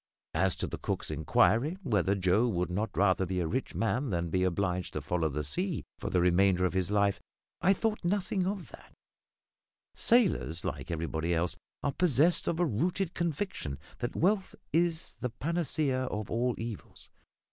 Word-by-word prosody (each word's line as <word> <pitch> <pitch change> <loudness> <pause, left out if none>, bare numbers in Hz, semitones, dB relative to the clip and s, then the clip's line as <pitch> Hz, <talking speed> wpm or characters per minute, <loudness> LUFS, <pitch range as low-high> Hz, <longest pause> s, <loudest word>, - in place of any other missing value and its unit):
As 95 -1 +2
to - - -2
the - - -6
cook's - - -2
inquiry 120 - +2
whether 100 - +2
Joe 95 +5 +3
would 90 -5 -1
not 105 +5 -1
rather 95 -1 +3
be 90 0 -1
a 85 - 0
rich 130 +11 -2
man 125 +5 0
than 85 -3 -1
be 90 +2 +2
obliged 90 0 -1
to - - -3
follow 85 -3 0
the 75 +1 -3
sea 175 - -1
for - - -3
the 90 - +2
remainder 90 +1 +4
of 90 - 0
his 95 -1 0
life, 100 -1 +2 0.4
I 195 - +5
thought 215 +1 -1
nothing 185 0 0
of 195 -1 -3
that; - - -14 1.0
sailors 195 - +2
like - - -4
everybody 85 0 -1
else 85 +1 0 0.3
are 145 - +1
possessed 170 +1 +3
of 165 - 0
a 175 - +4
rooted 170 - 0
conviction 170 - -2 0.2
that 120 - -3
wealth 195 +2 +1 0.2
is 165 0 0
the 125 - -2
panacea 145 -1 -1
of 105 -4 -4
all 120 +2 +1
evils. 115 -3 -7
110 Hz, 170 wpm, -30 LUFS, -, 1.0 s, I